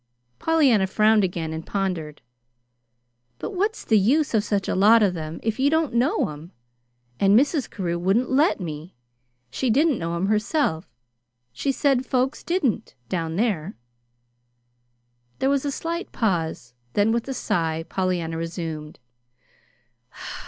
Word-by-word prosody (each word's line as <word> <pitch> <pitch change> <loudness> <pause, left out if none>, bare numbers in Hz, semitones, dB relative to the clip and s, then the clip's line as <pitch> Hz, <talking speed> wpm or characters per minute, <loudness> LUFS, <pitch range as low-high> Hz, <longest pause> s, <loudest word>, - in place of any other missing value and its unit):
Pollyanna 270 -12 +3
frowned 215 +2 +3
again 170 -3 -2
and 160 0 -5
pondered. 175 -7 -3 1.1
"But - - -5
what's 410 +4 -2
the 220 -2 +4
use 280 +10 +2
of 215 -2 +3
such 200 -2 -1
a - - 0
lot 215 +4 +6
of 195 -3 +2
them 160 -1 -6
if 225 +2 -2
you 275 +2 +4
don't 320 -3 +1
know 245 - +1
'em? 155 +4 -10 0.7
And 200 +1 +5
Mrs. 285 -1 0
Carew 175 -3 -3
wouldn't 195 +9 +1
let 290 +3 +3
me. 160 0 -7 0.6
She 260 - -1
didn't 285 +3 +3
know 170 0 -3
'em 170 +3 -1
herself. 210 - 0 0.6
She 275 - -1
said 270 -2 +1
folks 260 +1 -1
didn't, 335 - -1
down 165 -3 -2
there." 200 -4 -1 1.6
There 270 - +1
was 280 0 0
a 285 - 0
slight 335 +6 -4
pause, 165 - -2 0.2
then, 205 +2 +3
with 235 +2 -1
a 270 - -3
sigh, 165 -8 -1
Pollyanna 175 -2 -1
resumed. 165 -2 -5
205 Hz, 140 wpm, -24 LUFS, 170-265 Hz, 1.6 s, lot